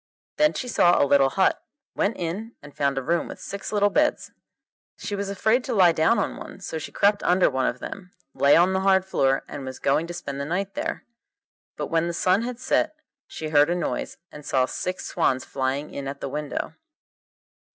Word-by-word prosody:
Then 300 0 +4
she 255 - -4
saw 175 -7 +4
a - - +5
little 140 -1 +4
hut, 190 +7 +1 0.3
went 210 - 0
in, 195 +7 -4
and 145 0 -13
found 140 -1 0
a 135 - -1
room 170 +5 0
with - - -9
six 200 - -6
little 205 -1 +2
beds. 300 0 +1 0.7
She 205 - -6
was 200 0 -3
afraid 220 +5 +1
to 250 - -2
lie 180 -4 +6
down 160 +8 +3
on - - -1
one, - - -10
so 165 -4 -5
she - - -7
crept 205 0 +2
under 180 -2 +3
one 130 -1 0
of 120 - -2
them, 180 +6 -8 0.2
lay 140 - +5
on 180 +3 +4
the 190 - +1
hard 190 -1 +3
floor, 135 -7 +1
and 140 - -7
was 130 0 -6
going 155 +4 +1
to 175 - -6
spend 140 -4 -5
the - - -2
night 190 +5 -2
there. - - -4 0.7
But - - -4
when 165 0 +2
the 170 - -2
sun 185 +4 +2
had 245 0 -4
set 255 - 0 0.3
she 155 - -6
heard 150 0 +4
a 175 - +1
noise, 175 - -3
and 150 - -11
saw 130 -2 +2
six 185 +7 -4
swans 130 -6 0
flying 135 +2 -2
in 140 -1 -5
at 140 +1 -6
the - - -4
window. 150 +1 -4
170 Hz, 215 wpm, -24 LUFS, 140-195 Hz, 0.7 s, lie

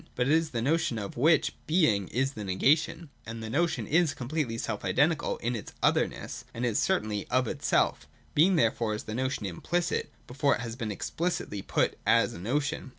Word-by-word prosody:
But 125 - +1
it 145 - +4
is 160 0 +2
the 115 -4 -2
notion, 145 -4 +1
of 100 -2 -5
which 155 +5 +3
Being 120 - +3
is 135 +2 0
the 110 - -6
negation: 150 - +1
and 115 0 -7
the 110 - -5
notion 170 +6 0
is 165 0 +2
completely 130 -2 -2
self 110 -2 -3
identical 150 +3 +1
in 120 +1 -2
its 110 - -7
otherness, - - 0
and 120 +2 -1
is 115 -3 +1
the - - +2
certainty 110 - -1
of 130 -1 +1
itself - - 0 0.3
Being 180 +6 +5
therefore 115 -5 +1
is 105 - -6
the 110 - -6
notion 130 -2 -2
implicit, 170 - -1 0.2
before 140 +3 +1
it - - -6
has 115 -2 -5
been 115 -4 -4
explicitly 130 - -3
put - - 0
as 115 +1 +4
a - - -8
notion. 145 - -2
125 Hz, 195 wpm, -29 LUFS, 110-155 Hz, 0.3 s, Being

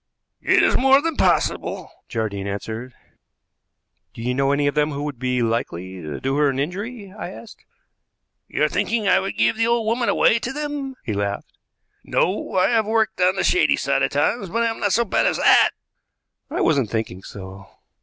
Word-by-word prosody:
"It - - +4
is - - +3
more 270 +1 +5
than 325 +1 -2
possible," - - 0 0.2
Jardine 100 -4 -3
answered. 110 +5 -6 1.2
"Do 115 - -7
you 125 +1 0
know 135 +1 +1
any 145 0 +1
of 145 - +1
them 150 0 +1
who 140 +1 -4
would 145 -5 -5
be 125 -1 0
likely 95 -5 -3
to 75 -3 -6
do 135 +1 -1
her 145 -1 +3
an 135 - -2
injury?" 195 - -4
I 210 - -6
asked. 220 +4 -12 0.8
"You're - - +1
thinking 225 -3 -1
I 185 0 +5
would 195 +1 -4
give - - +2
the 225 0 +2
old 235 -1 +1
woman 235 +2 0
away 230 - +3
to 235 +3 -4
them?" 290 -2 -4
he 110 - -3
laughed. 100 0 -3 0.5
"No; 190 +4 -1
I 185 0 +3
have 225 -3 +2
worked 220 -2 0
on 180 +1 +4
the - - -1
shady 360 - +3
side - - 0
at - - 0
times, 205 -6 0
but 230 +6 0
I 230 - +1
am 225 - -7
not 205 - 0
so 235 +3 +2
bad 200 - +1
as - - 0
that." - - +5 0.8
"I - - -2
wasn't 140 -8 +2
thinking 110 -4 -3
so." 95 0 -10
170 Hz, 195 wpm, -22 LUFS, -, 1.2 s, more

